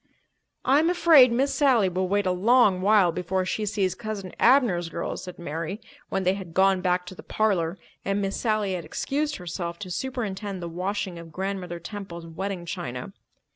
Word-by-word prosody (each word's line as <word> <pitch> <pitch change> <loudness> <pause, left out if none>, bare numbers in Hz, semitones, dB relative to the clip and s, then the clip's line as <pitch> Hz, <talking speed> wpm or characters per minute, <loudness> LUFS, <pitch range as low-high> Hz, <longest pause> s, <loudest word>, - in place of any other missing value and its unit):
"I'm 290 +6 +4
afraid 320 -8 +6
Miss 270 +4 +1
Sally 255 -9 +4
will 185 +1 -1
wait 205 +1 +1
a 185 - +2
long 200 0 +4
while 200 -3 +5
before 180 +2 -1
she 210 +3 -2
sees 195 -3 0
Cousin 215 -5 -6
Abner's 230 -10 +4
girls," 170 - -4
said 180 -1 -9
Mary, 165 +4 -4 0.3
when 195 - -1
they 185 +1 +3
had 185 -4 -8
gone 190 -1 +4
back 180 0 +1
to 180 - -8
the - - -11
parlour 190 -5 0 0.3
and 195 +1 0
Miss 195 -1 -1
Sally 215 -4 0
had 175 -2 -3
excused 290 - -2
herself 170 -1 -5
to 185 -1 -7
superintend 205 -4 -3
the 170 - -5
washing 185 +1 -3
of 165 -1 -11
Grandmother 185 -1 -4
Temple's 170 -2 -7
wedding 180 +2 -5
china. 170 -3 -5
190 Hz, 175 wpm, -26 LUFS, 180-215 Hz, 0.3 s, afraid